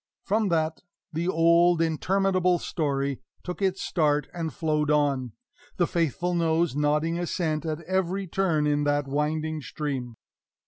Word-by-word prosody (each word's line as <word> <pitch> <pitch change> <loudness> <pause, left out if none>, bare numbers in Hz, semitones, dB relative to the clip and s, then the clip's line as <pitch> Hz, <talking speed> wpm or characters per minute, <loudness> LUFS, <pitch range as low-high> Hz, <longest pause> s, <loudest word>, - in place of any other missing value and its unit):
From 210 +1 +1
that 160 -1 0 0.3
the 165 +3 -1
old 170 0 +4
interminable 185 +2 +2
story 140 -5 -2 0.2
took 180 +2 -6
its 190 -1 0
start 150 -4 +1
and 165 -2 -3
flowed 150 +1 0
on, 140 -5 +1 0.4
the 175 - +3
faithful 170 +1 -1
nose 165 -3 +1
nodding 150 +3 +1
assent 160 -3 -1
at 155 +1 -3
every 190 +2 -1
turn 170 -4 +1
in 145 0 +1
that 145 -1 +1
winding 155 +2 -1
stream. 135 -5 -4
160 Hz, 135 wpm, -26 LUFS, 150-175 Hz, 0.4 s, old